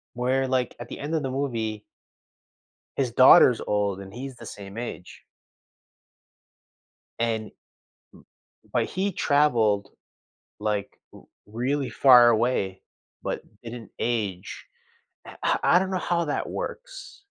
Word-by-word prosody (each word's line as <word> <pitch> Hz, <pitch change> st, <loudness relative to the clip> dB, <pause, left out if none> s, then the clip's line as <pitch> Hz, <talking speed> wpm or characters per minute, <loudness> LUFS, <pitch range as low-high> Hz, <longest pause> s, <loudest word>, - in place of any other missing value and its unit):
Where, 130 Hz, +2 st, 0 dB
like, 130 Hz, -1 st, -1 dB
at 120 Hz, -, -7 dB
the -, -, -8 dB
end 145 Hz, +3 st, -4 dB
of 155 Hz, -, 0 dB
the 135 Hz, -, -2 dB
movie 115 Hz, -6 st, -3 dB, 1.1 s
his 130 Hz, -4 st, 0 dB
daughter's 125 Hz, -1 st, +7 dB
old 100 Hz, -2 st, 0 dB
and 95 Hz, 0 st, -10 dB
he's 130 Hz, +1 st, -7 dB
the 115 Hz, -, -11 dB
same 100 Hz, 0 st, -10 dB
age. 115 Hz, -6 st, -7 dB, 2.0 s
And 115 Hz, -2 st, 0 dB
m -, -, -16 dB, 1.2 s
but -, -, +2 dB
he 195 Hz, +2 st, -2 dB
traveled, 115 Hz, -11 st, +2 dB, 0.7 s
like, 105 Hz, -1 st, -3 dB
r -, -, -13 dB, 0.3 s
really 130 Hz, +6 st, -2 dB
far 125 Hz, -3 st, +7 dB
away, 110 Hz, -5 st, 0 dB, 0.4 s
but -, -, -3 dB, 0.2 s
didn't 115 Hz, 0 st, -9 dB
age, 105 Hz, -6 st, -3 dB, 0.6 s
eh -, -, -11 dB
uh, -, -, +2 dB
I 180 Hz, -, +5 dB
don't 190 Hz, 0 st, -2 dB
know 190 Hz, -, -1 dB
how 170 Hz, -1 st, +2 dB
that 150 Hz, -, -2 dB
works. -, -, -7 dB
120 Hz, 130 wpm, -25 LUFS, 105-135 Hz, 2.0 s, daughter's